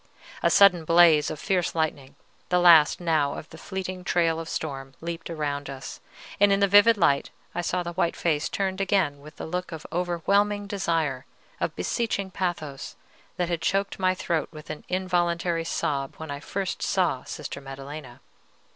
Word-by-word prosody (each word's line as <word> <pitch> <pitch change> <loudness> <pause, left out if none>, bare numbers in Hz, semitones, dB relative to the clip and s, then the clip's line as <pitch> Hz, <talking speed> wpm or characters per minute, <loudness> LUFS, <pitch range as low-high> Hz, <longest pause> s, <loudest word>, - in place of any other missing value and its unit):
A - - +3
sudden 185 -4 +6
blaze 165 -2 +5
of 155 - -6
fierce 180 -4 0
lightning, 150 -4 -2 0.3
the 180 - +3
last 170 -4 +7
now 155 -5 +1
of 155 - -8
the 160 - -11
fleeting 185 -1 -5
trail 165 -2 +1
of 165 0 -6
storm, 135 -3 -5
leaped 165 0 -6
around 145 -3 -3
us, 135 -1 -8 0.4
and 205 0 +5
in 195 - +3
the 200 - +4
vivid 205 +3 +6
light 140 -7 +2 0.2
I 175 - -1
saw 180 +1 -1
the 175 0 -5
white 170 -1 0
face 155 -3 0
turned 190 -1 -2
again 185 -8 +1
with 150 +2 -13
the - - -7
look 180 +2 -4
of 160 -1 -7
overwhelming 200 +4 +1
desire, 165 - -1 0.3
of - - -2
beseeching 200 -5 -2
pathos, 160 -7 -4 0.4
that 175 -1 -1
had 170 -2 -1
choked 195 +4 0
my 185 0 +2
throat 170 -3 -1
with 155 -1 -9
an 155 - -8
involuntary 175 -2 0
sob 140 -4 -2
when 160 -1 -8
first 195 +2 -3
I - - -2
saw 175 -9 +1
Sister 140 - -7
Maddelena. 135 -1 -9
170 Hz, 175 wpm, -26 LUFS, 150-185 Hz, 0.4 s, last